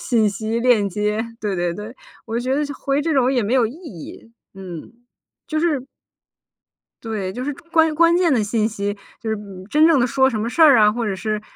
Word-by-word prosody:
信 225 -4 +2
息 220 +3 -3
链 230 -5 +3
接， 210 +3 -1 0.2
对 205 -3 -2
对 175 -1 -1
对。 210 +4 -8 0.3
我 230 0 -2
觉 255 +2 -1
得 295 - 0
就 285 - -5
回 275 +2 -1
这 325 - 0
种 260 -2 +2
也 245 -4 +1
没 225 +6 0
有 245 -4 +4
意 235 - -8
义， 230 - -11 0.2
嗯， 185 0 -9 0.6
就 310 - -1
是 310 -6 0 1.2
对， 205 -4 -4
就 250 +4 -5
是 290 - -2 0.2
关 320 -2 +3
关 335 +2 +4
键 350 -3 +3
的 230 -5 +2
信 215 +1 0
息， 205 -1 -3 0.2
就 225 - -8
是， 220 - 0
嗯， 195 -3 -10
真 310 +2 +5
正 315 -5 +4
的 240 - +3
说 265 +1 +2
什 220 - -3
么 220 - -2
事 290 +7 -1
儿 285 -6 +8
啊， 210 -1 +6
或 235 +1 -3
者 200 -3 -2
是 215 +2 -3
230 Hz, 240 characters per minute, -21 LUFS, 210-275 Hz, 1.2 s, 儿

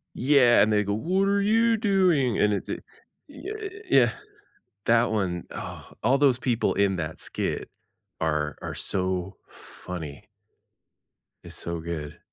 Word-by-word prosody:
Yeah, 125 -4 +5
and 110 +1 +3
they 105 0 +3
go, 100 0 -1
"What 185 - +1
are 200 0 +2
you 225 +2 +3
doing?" 180 - +2
and 105 0 +3
it's 100 - -4
a - - -1
y - - -5 0.7
ye 415 -1 -6
yeah, - - +5 0.7
that 115 0 +3
one. 95 -5 -1
Oh, - - -8
all 130 +4 +4
those 135 -3 +3
people 120 -3 +1
in 100 -1 +2
that 80 -2 -4
skit - - -3 0.5
are 75 -2 -1
are - - -5
so 95 0 -2
funny 85 -1 -9 1.2
it's - - -11
so 85 0 -4
good. 80 -3 -6
110 Hz, 145 wpm, -26 LUFS, -, 1.2 s, Yeah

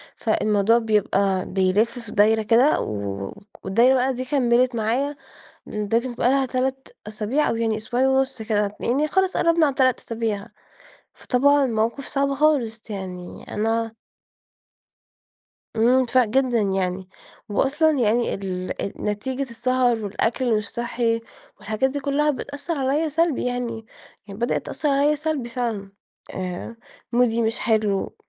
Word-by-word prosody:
فالموضوع 215 0 +2
بيبقى 200 -4 +1
بيلّف 205 +6 +1
في 230 -3 -9
دايرة 220 +2 +4
كده 235 +7 +4
و - - -2 0.4
و - - -9 0.3
والدايرة 235 +7 +4
بقي 260 +1 +1
دي 255 +1 -4
كمّلت 250 -2 +2
معايا 250 +7 0 0.5
ب 210 +2 0
تبقى 245 0 -1
لها 270 0 +3
3 265 +1 -2 0.2
أسابيع 215 +8 0
أو 230 - 0
يعني 225 -1 0
أسبوعين 245 +4 0
ونص 265 -3 +1
كده، 210 -2 -1
يعني 280 +6 +1
خلاص 380 +2 +1
قرّبنا 335 -1 +3
على - - +3
ال3 255 -2 +2
أسابيع، 225 -2 -3 0.7
فطبعًا 280 +2 +3
موقف 230 +4 -1
صعب 275 0 0
خالص 250 -7 +1
يعني 185 -3 -7
أنا 225 +1 -1 1.8
امم، 250 +3 +4
فرق 250 0 +3
جدًا 250 0 +2
يعني. 190 -1 -1 0.4
وأصلًا 295 +8 +2
يعني 235 +1 +2
ال 185 -2 -4
أ 195 - -2
نتيجة 230 +6 -2
السهر 245 -2 0
والأكل 225 +5 -1
اللي 230 -3 +2
مش 210 -1 -4
صحّي 235 -1 -1 0.4
والحاجات 220 +5 0
دي 285 +2 -3
كلها 285 +2 +1
بتأثرعليَّا 285 +1 -2
سلبي 320 -3 0
يعني، 240 -3 -3 0.4
يعني 200 +2 -9
بدأت 240 - -1
تأثرعليَّا 290 0 +1
سلبي 300 -5 -3
فعلًا، 225 -5 -3 0.4
آآ، 185 +5 -5 0.4
مودي 235 -1 +2
مش 225 +1 -1
حلو، 215 -3 0
235 Hz, 135 wpm, -23 LUFS, 215-265 Hz, 1.8 s, دايرة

